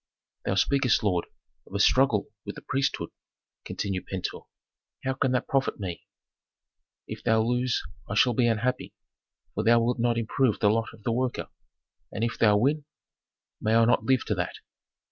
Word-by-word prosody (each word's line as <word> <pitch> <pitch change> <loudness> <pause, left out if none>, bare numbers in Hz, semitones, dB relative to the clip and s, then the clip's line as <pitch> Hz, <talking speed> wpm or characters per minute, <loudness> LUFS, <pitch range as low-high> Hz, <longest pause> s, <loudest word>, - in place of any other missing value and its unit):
"Thou 95 - 0
speakest, 125 +4 +2
lord, 90 -4 +1 0.4
of 95 - -10
a - - 0
struggle 125 0 +3
with - - -7
the - - -10
priesthood," 135 +1 -1 0.5
continued 95 -2 -4
Pentuer. 95 -1 -5 0.6
"How 130 0 0
can 130 -1 0
that 125 - 0
profit 135 -4 0
me? 90 -4 -6 1.0
If - - -7
thou 110 0 +3
lose 125 +1 0 0.3
I 100 - -2
shall 125 +3 +4
be 120 +1 +2
unhappy, 120 +3 -1 0.6
for - - -2
thou 115 +1 +5
wilt 120 +1 0
not 120 0 +1
improve 115 +1 +1
the 105 - +4
lot 115 +1 0
of 105 - -21
the 115 - 0
worker. 125 +1 -1 0.6
And 110 - -3
if 115 - -2
thou 105 -2 +5
win? 145 +6 +1 0.8
May 110 +1 +2
I 115 0 +6
not 120 - +3
live 130 -2 +2
to - - 0
that! 90 -3 -3
115 Hz, 170 wpm, -27 LUFS, 105-125 Hz, 1.0 s, I